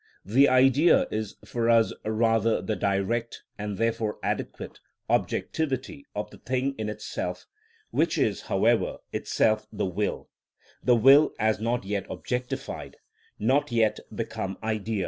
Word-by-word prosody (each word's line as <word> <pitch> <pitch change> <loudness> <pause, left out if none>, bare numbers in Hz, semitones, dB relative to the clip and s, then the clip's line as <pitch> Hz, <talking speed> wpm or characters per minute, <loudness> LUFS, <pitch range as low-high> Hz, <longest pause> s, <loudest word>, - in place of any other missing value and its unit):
The 130 +9 +5
Idea 135 +5 +5
is 110 -1 -3
for 115 -1 -1
us 115 -1 +4
rather 115 +1 +2
the 110 - -2
direct, 100 +5 -1 0.2
and 105 -1 -4
therefore 115 -2 -1
adequate, - - -4 0.3
objectivity 140 -2 -1
of 105 - -4
the - - -14
thing 130 +2 -1
in 110 -1 -2
itself, 105 0 -5 0.5
which - - +1
is, - - +1
however, - - +2 0.2
itself 110 -1 +1
the 105 - -2
will—the 105 +5 -3
will 135 +6 +6
as 110 -1 +1
not 115 +1 -1
yet 100 0 -3
objectified, 125 0 -4 0.4
not 130 +5 +1
yet 110 -2 +2
become 95 0 -4
idea. 110 -1 -2
115 Hz, 125 wpm, -27 LUFS, 105-125 Hz, 0.5 s, will